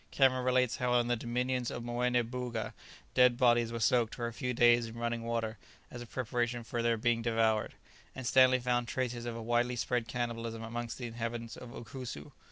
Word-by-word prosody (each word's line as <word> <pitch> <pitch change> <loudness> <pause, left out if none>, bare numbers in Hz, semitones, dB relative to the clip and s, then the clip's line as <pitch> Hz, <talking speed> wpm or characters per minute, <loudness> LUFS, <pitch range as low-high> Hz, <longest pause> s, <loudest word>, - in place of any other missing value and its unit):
Cameron 130 -2 +3
relates 125 -1 +2
how 125 -2 +2
in 120 - +1
the 120 - +3
dominions 125 +1 -1
of 120 - -5
Moené 120 0 +1
Booga 120 -2 -4 0.4
dead 125 -1 +5
bodies 120 -2 +4
were 115 - -3
soaked 115 +1 +2
for 120 - -3
a 115 - -4
few 125 +4 -2
days 120 -1 +4
in 115 +1 -9
running 115 0 -2
water 115 -2 -2 0.3
as 120 - -7
a 120 - -8
preparation 120 0 -2
for 120 +1 -3
their 115 0 +2
being 115 +1 +1
devoured; 115 -2 +1 0.4
and 130 - -6
Stanley 130 +1 +6
found 120 -1 0
traces 120 -2 -2
of 120 - -4
a 115 - -6
widely 120 +2 +1
spread 120 0 -1
cannibalism 115 -2 -3
amongst 120 +1 -5
the 125 - -5
inhabitants 115 0 -4
of 125 - -10
Ukusu. 120 - -8
120 Hz, 195 wpm, -32 LUFS, 115-125 Hz, 0.4 s, Stanley